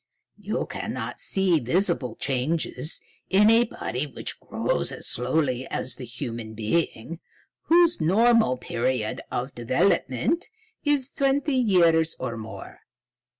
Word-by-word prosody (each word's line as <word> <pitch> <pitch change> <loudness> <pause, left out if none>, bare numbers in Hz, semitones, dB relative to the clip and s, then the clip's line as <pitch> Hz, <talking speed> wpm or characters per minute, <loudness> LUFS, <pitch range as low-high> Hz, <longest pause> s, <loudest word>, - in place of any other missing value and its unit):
You - - -2
cannot - - -5
see 190 -4 +2
visible 150 - 0
changes 140 +2 -1 0.3
in 210 +3 +5
a 230 +1 +5
body 145 - -3
which 140 - -4
grows - - -1
as - - -7
slowly 130 0 0
as 130 - -2
the 130 - -8
human 115 -2 -6
being, 135 +5 -2 0.5
whose 335 - +4
normal 220 - +4
period 120 -2 -2
of 125 +3 -3
development 130 - +1 0.3
is 285 -2 +2
twenty 275 +1 +1
years 170 -10 +3
or 125 -2 -3
more. 110 -1 -9
155 Hz, 115 wpm, -25 LUFS, -, 0.5 s, in